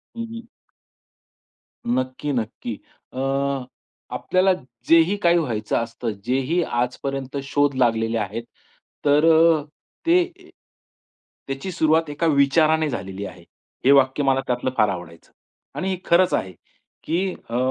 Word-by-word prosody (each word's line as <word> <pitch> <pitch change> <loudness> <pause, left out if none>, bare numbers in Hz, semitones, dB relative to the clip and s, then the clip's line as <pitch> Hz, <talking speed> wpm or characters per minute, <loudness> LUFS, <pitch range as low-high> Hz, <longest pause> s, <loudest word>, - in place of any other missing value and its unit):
हं, 230 - -4
हं. 230 0 -9 1.4
नक्की, 130 - -1
नक्की. 125 - -4 0.4
अ, - - -10 1.0
आपल्याला 185 +1 +2 0.3
जेही 165 +4 +5
काही 170 0 +5
व्हायचं 115 -10 -1
असतं, 115 0 -3
जेही 135 +7 +1
आजपर्यंत 135 +2 -3
शोध 145 +1 +1
लागलेले 115 -2 +1
आहेत. 110 +2 -3 0.6
तर 145 +2 +4
अ, 160 -1 +5 0.4
ते 350 +2 +5 1.2
त्याची 135 +7 -4
सुरुवात 160 -2 +2
एका 145 +3 -1
विचाराने 155 +2 +3
झालेली 95 -4 -5
आहे. 90 -3 -10 0.4
हे 135 - +7
वाक्य 135 +1 +4
मला 135 -1 +2
त्यातलं 125 +1 0
फार 105 - +4
आवडायचं. 85 -3 -8 0.4
आणि 190 - -2
हे 190 - -1
खरंच 175 +2 +4
आहे, 95 - -1 0.5
की 185 +4 0 0.2
अ, 115 - -2
140 Hz, 120 wpm, -23 LUFS, 120-165 Hz, 1.4 s, हे